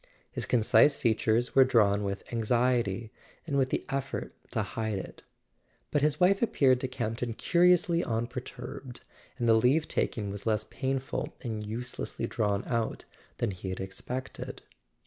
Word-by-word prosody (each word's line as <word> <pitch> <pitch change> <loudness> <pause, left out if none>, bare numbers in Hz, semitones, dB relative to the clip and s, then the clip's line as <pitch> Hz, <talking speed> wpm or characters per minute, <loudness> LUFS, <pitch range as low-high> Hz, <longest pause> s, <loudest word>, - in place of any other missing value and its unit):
His - - -4
concise 120 +4 +5
features 115 0 +1
were 135 - +8
drawn 105 -5 +3
with 100 0 -3
anxiety, 115 -2 +1 0.3
and 145 -4 -2
with 135 -2 +2
the - - -1
effort 135 0 -3 0.2
to - - -1
hide 110 -3 -3
it; 95 - -8 0.7
but 145 - +2
his 150 +2 +2
wife 190 +2 +4
appeared 135 - +3
to 130 - -2
Campton 120 -2 -3
curiously 175 - +3
unperturbed, 125 +2 -5 0.4
and 120 -2 0
the 115 - +6
leave 125 +8 +3
taking 105 -3 -1
was 100 +2 -6
less 110 -1 +2
painful 135 +2 -3
and 110 -4 -4
uselessly 115 +1 -4
drawn 105 -4 0
out 115 -2 -2 0.3
than 115 - 0
he 95 0 -6
had 95 - -4
expected. 110 +7 -5
120 Hz, 145 wpm, -29 LUFS, 110-135 Hz, 0.7 s, were